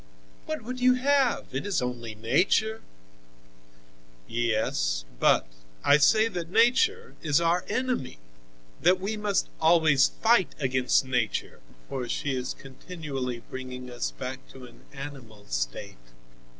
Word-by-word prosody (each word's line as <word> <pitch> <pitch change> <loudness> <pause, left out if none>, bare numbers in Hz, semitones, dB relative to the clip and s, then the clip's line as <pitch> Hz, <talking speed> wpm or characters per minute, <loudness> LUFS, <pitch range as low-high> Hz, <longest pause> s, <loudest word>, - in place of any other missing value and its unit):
"What 310 -6 -4
would 255 +3 -6
you 255 0 +5
have? 270 -1 +2
It 135 - -2
is 200 -1 0
only 120 -3 -4
Nature!" 205 - +1 1.5
"Yes, 110 - 0
but - - +4 0.4
I 145 - +6
say 215 +10 +5
that 175 -6 -5
Nature 335 - +3
is 150 -2 +2
our 170 +1 +2
enemy, 255 - -2 0.6
that 180 +2 +4
we 200 +4 -3
must 210 -2 0
always 160 -4 +5
fight 225 -5 +2
against 130 -1 +2
Nature, 125 -4 -2 0.3
for 125 -3 -4
she 140 -2 -1
is 125 0 -3
continually 135 -4 -6
bringing 125 -1 -7
us 120 - -2
back 130 +1 -6
to 130 -1 -11
an 120 - -17
animal 135 -7 -10
state. - - -4
145 Hz, 125 wpm, -27 LUFS, -, 1.5 s, I